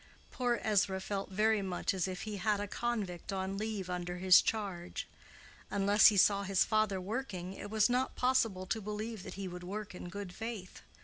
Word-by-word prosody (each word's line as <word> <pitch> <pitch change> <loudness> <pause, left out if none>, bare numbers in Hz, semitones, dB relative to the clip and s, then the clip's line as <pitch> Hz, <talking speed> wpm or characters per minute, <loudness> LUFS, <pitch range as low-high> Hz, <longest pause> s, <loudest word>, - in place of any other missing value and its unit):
Poor 245 -2 0
Ezra 200 -3 +2
felt 195 +1 -3
very 215 +2 +2
much 185 -1 -1
as 190 -1 0
if 185 0 -5
he 215 -2 -4
had 205 +2 +1
a 205 - -3
convict 205 -7 -3
on 190 0 -2
leave 215 -3 -3
under 180 0 -3
his 185 0 +7
charge. 195 -6 -3 0.6
Unless 200 +1 +5
he 210 - +4
saw 200 +1 +5
his 195 -1 +2
father 215 -3 +1
working, 190 -3 -4
it 205 - -8
was 215 0 +3
not 250 +1 0
possible 230 -7 +1
to 220 +4 -2
believe 210 +1 -4
that 195 - -8
he 195 0 -4
would 180 0 -7
work 205 +3 -5
in 180 0 -7
good 195 -1 -6
faith. 220 -3 -6
200 Hz, 190 wpm, -33 LUFS, 185-215 Hz, 0.6 s, his